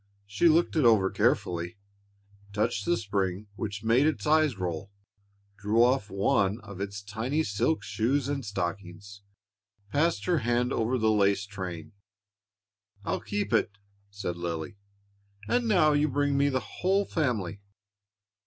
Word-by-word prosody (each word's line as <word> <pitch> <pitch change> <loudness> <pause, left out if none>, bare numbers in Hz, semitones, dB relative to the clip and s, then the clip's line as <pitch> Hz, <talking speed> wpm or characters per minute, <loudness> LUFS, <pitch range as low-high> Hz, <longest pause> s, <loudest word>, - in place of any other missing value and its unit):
She 100 +12 +2
looked 165 +2 +2
it 155 - +3
over 110 -5 +4
carefully, 85 +1 0 0.8
touched 110 +3 -1
the 175 0 +2
spring 100 -2 -2
which 100 -1 -5
made 120 +6 +4
its 155 - -1
eyes 155 -5 +3
roll, 90 +1 -4 0.7
drew 105 +3 +3
off 125 -4 +2
one 100 +2 +1
of 100 -3 -9
its 100 0 -5
tiny 115 +10 -1
silk 155 +8 0
shoes 130 +4 0
and 140 -1 -2
stockings, 100 0 -5 0.7
passed 165 +3 +1
her 175 -3 +2
hand 120 +1 0
over 115 +3 0
the 110 -2 +2
lace 100 -1 +2
train. 95 -2 -7 1.1
"I'll - - -1
keep 105 +2 -3
it," 105 -2 +1 0.3
said 100 -4 -5
Lily; 85 0 -4 0.7
"and 245 -1 +1
now 175 -8 +4
you 145 +1 +2
bring 145 +1 +1
me 140 +1 +3
the 130 -2 -4
whole 195 +2 +2
family." 110 - -2
110 Hz, 140 wpm, -28 LUFS, 100-140 Hz, 1.1 s, over